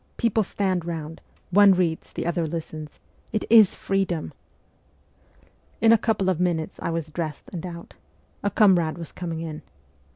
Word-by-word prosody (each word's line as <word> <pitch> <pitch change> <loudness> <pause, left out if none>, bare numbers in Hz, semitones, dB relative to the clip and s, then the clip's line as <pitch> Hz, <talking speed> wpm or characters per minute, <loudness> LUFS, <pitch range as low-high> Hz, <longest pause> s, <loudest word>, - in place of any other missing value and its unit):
People 230 -1 +2
stand 190 -3 -1
round; 160 -2 -6 0.3
one 200 +1 +7
reads, 170 -3 -1
the - - -4
others 170 -2 -1
listen. 155 -2 -6 0.4
It 215 - -1
is 220 -4 +7
freedom! 195 -4 -2 0.7
' - - -34
In 225 - +5
a - - +6
couple 215 -4 0
of 185 -3 +1
minutes 170 -3 -1
I - - -2
was 165 -2 -3
dressed 155 -2 -5
and 170 - -5
out. 170 -1 -9 0.5
A 205 - 0
comrade 180 -6 +3
was 165 -2 -7
coming 165 -2 -5
in. 155 -2 -6
175 Hz, 160 wpm, -24 LUFS, 160-195 Hz, 0.7 s, one